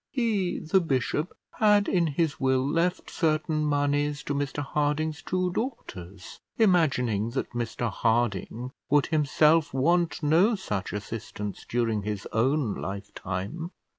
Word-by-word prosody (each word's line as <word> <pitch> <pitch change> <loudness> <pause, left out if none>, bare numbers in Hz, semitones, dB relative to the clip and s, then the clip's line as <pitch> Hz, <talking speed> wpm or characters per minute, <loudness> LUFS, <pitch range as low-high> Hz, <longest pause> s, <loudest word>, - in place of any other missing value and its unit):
He, 215 -8 0
the 185 +5 +2
bishop, 150 +1 -1 0.3
had 210 -2 +4
in 175 -3 +2
his 155 +1 -1
will 130 0 +2
left 170 +4 0
certain 155 -1 0
moneys 145 0 0
to 145 - -2
Mr 145 0 -2
Harding's 150 +2 -1
two 185 -1 -1
daughters, 100 - -6 0.2
imagining 130 - +2
that - - -2
Mr 120 -1 -2
Harding 115 +2 0 0.2
would 145 0 +4
himself 155 0 +3
want 170 +4 +1
no 175 +10 +4
such 105 - -4
assistance 105 -1 -6
during 115 -3 0
his 105 -1 -4
own 125 0 +1
lifetime. 100 - -5
145 Hz, 125 wpm, -27 LUFS, 115-165 Hz, 0.3 s, had